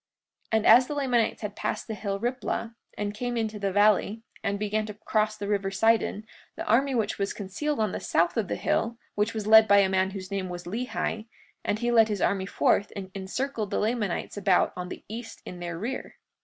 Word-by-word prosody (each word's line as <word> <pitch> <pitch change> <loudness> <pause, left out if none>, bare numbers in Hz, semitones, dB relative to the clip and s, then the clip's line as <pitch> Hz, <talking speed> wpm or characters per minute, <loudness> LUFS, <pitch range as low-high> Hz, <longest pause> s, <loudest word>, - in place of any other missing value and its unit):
43:35 220 - +4
And 220 - -1
as 250 +3 +7
the - - -3
Lamanites 250 -6 +1
had 210 -1 -4
passed - - -3
the 225 - -3
hill 200 -1 -3
Riplah, 240 -1 -2 0.2
and 205 0 -2
came 245 +2 -3
into 220 -2 -2
the 200 -1 -1
valley, 210 +2 +3 0.2
and 200 -1 0
began 210 +1 -1
to 210 - -7
cross 215 0 0
the 200 - -4
river 200 -1 0
Sidon, 215 +1 +2 0.3
the - - -5
army 265 +4 +3
which 225 -3 -1
was 200 0 -1
concealed 250 +9 -3
on 215 -3 +1
the - - -3
south 170 +1 +1
of 220 -4 0
the - - -2
hill, 230 +1 0 0.2
which 210 +2 0
was 215 -2 -3
led 220 0 +8
by 200 0 +6
a 195 -1 +5
man 190 0 +2
whose 190 0 -7
name 195 -2 -2
was 175 0 -6
Lehi, 220 +2 -3 0.4
and 205 - 0
he 240 +2 0
led 225 -2 +6
his 210 -2 -2
army 190 0 +1
forth 200 - +2
and 190 -2 -6
encircled 215 +3 -3
the 200 - -1
Lamanites 210 -4 -1
about 190 -2 +3
on 180 0 -5
the - - -8
east 225 +2 -8
in 180 - -8
their 175 -1 -4
rear. 240 +8 -5
210 Hz, 220 wpm, -27 LUFS, 195-225 Hz, 0.4 s, led